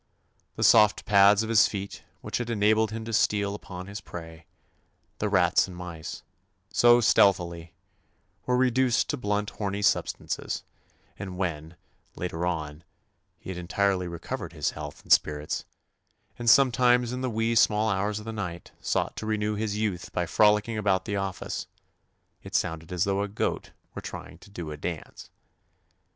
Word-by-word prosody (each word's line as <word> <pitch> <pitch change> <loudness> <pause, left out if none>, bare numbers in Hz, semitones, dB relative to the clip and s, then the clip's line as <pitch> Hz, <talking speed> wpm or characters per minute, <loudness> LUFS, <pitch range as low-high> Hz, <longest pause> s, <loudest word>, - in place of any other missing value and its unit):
The - - -2
soft 105 -1 +5
pads 100 +1 +5
of 110 - -5
his 115 -2 +6
feet 100 -1 -6 0.2
which - - -3
had 120 -1 -4
enabled 110 0 +3
him 110 +1 -6
to 115 - -5
steal 100 -1 +2
upon 90 -3 -8
his 100 0 -7
prey 80 -2 -10 0.3
— - - -43
the - - 0
rats - - +3
and 90 -2 -10
mice 85 -3 -7 0.2
— - - -36
so> 120 0 +6
stealthily, 85 -6 +2 0.7
were 125 0 +2
reduced 125 -1 +2
to 145 - -3
blunt 105 -3 -1
horny 100 0 -3
substances, - - -1 0.6
and 95 -2 -6
when, 85 -3 -3 0.4
later 90 -1 -3
on, 75 -2 -4 0.5
he - - -8
had 90 - -6
entirely 90 +1 0
recovered 85 -1 -6
his - - -1
health 75 -1 -8
and - - -11
spirits, 75 0 +2 0.7
and 120 -1 +1
sometimes 125 -2 +4
in 125 - -4
the 130 - -1
"wee 115 0 0
sma' 110 -1 +3
hours" 100 +2 -1
of 105 - -7
the 110 - -5
night 90 -5 -6
sought - - -1
to 110 - -5
renew 105 -1 0
his 105 0 -2
youth 105 -5 -2
by 90 - -1
frolicking 105 +4 +3
about 95 -3 +1
the 105 - -2
office, 95 -2 -4 0.7
it - - -8
sounded 80 -1 -1
as 90 -1 0
though 100 0 0
a 100 - -1
goat 100 - -2 0.2
were - - -6
trying - - -8
to - - -16
"do 85 -6 -7
a 75 - -6
dance." 80 +1 -6
100 Hz, 165 wpm, -27 LUFS, 90-110 Hz, 0.7 s, his